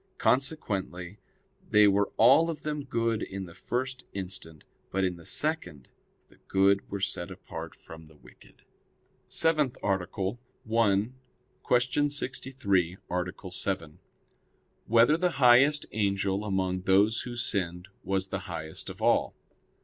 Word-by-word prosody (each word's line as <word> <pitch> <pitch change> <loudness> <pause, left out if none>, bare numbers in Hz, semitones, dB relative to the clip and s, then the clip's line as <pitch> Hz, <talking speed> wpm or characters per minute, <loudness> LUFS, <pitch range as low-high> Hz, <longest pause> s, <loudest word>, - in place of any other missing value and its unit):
Consequently 100 - -1 0.5
they 105 0 +6
were 100 0 +2
all 135 +9 +6
of 160 - -5
them 150 -1 -3
good 115 -4 0
in 95 0 -5
the 85 - -12
first 125 +6 -3
instant; 90 -5 -6 0.3
but 95 0 -1
in 90 -1 0
the 85 -1 -13
second 115 - -2 0.4
the - - -23
good 100 +1 +2
were 100 - -4
set 95 -2 -2
apart - - -8
from 80 -1 -13
the 80 - -19
wicked. - - -19 0.7
_______________________ - - -27
SEVENTH 155 -6 +2
ARTICLE 95 +2 -1 0.3
[I, 110 -1 +2 0.7
Q. 145 +4 0
63, 125 - -1
Art. 90 +1 -4
7] 80 -6 -2 0.9
Whether 115 +7 +5
the 180 +1 +1
Highest 140 +3 +5
Angel 100 -1 0
Among 95 -2 -1
Those 100 +4 +3
Who 120 -1 -6
Sinned 90 -6 -2
Was 95 0 -1
the 100 - -3
Highest 80 -2 -5
of - - -8
All? - - +2
100 Hz, 135 wpm, -28 LUFS, 95-125 Hz, 0.9 s, they